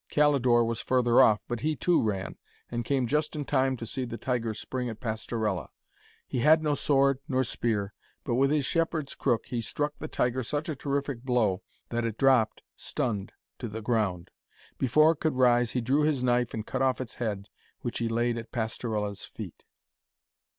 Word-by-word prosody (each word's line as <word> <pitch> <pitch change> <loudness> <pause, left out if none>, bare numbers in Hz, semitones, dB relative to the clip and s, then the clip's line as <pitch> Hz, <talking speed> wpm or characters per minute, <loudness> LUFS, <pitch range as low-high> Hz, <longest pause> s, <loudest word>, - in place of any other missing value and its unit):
Calidore 130 -5 +4
was 115 0 -2
further 125 -1 +4
off, 110 -5 +5
but 120 -1 -3
he, 155 +4 0
too, 175 +6 +2
ran, 100 -4 -2 0.4
and 120 0 -2
came 130 +1 +1
just 150 +5 0
in 145 -2 -3
time 130 -1 +1
to 115 - -6
see 130 +3 -3
the 115 -2 -5
tiger 120 -3 -1
spring 125 +3 -4
at 110 -1 -7
Pastorella. 110 -4 -2 0.6
He 125 - -3
had 155 +5 +5
no 150 -1 +2
sword 140 -2 +3
nor 130 -3 +1
spear, 105 -4 -1 0.3
but 120 - -2
with 135 +3 +3
his 145 -2 +1
shepherd's 165 -3 0
crook 120 -4 0
he 120 -2 -3
struck 145 +6 -2
the - - -5
tiger 125 +1 0
such 145 +6 -3
a 155 - -2
terrific 140 -2 -2
blow, 120 -7 +1 0.3
that 120 0 -1
it 115 -2 -2
dropped, 130 -5 +3
stunned, 105 -4 -3 0.3
to 120 - -4
the 110 +1 -6
ground. 105 -7 0 0.5
Before 155 +5 +5
it 160 - -5
could 155 -4 0
rise, 120 -2 +3
he 125 - 0
drew 135 +6 +2
his 150 -4 +1
knife 120 -1 +2
and 110 -1 -4
cut - - -3
off 130 -1 +2
its 130 -3 -5
head, 105 -3 -2 0.3
which 120 - -3
he 115 -1 0
laid 120 +1 0
at 115 - -10
Pastorella's 110 -3 -3
feet. - - -9
125 Hz, 190 wpm, -28 LUFS, 115-140 Hz, 0.6 s, off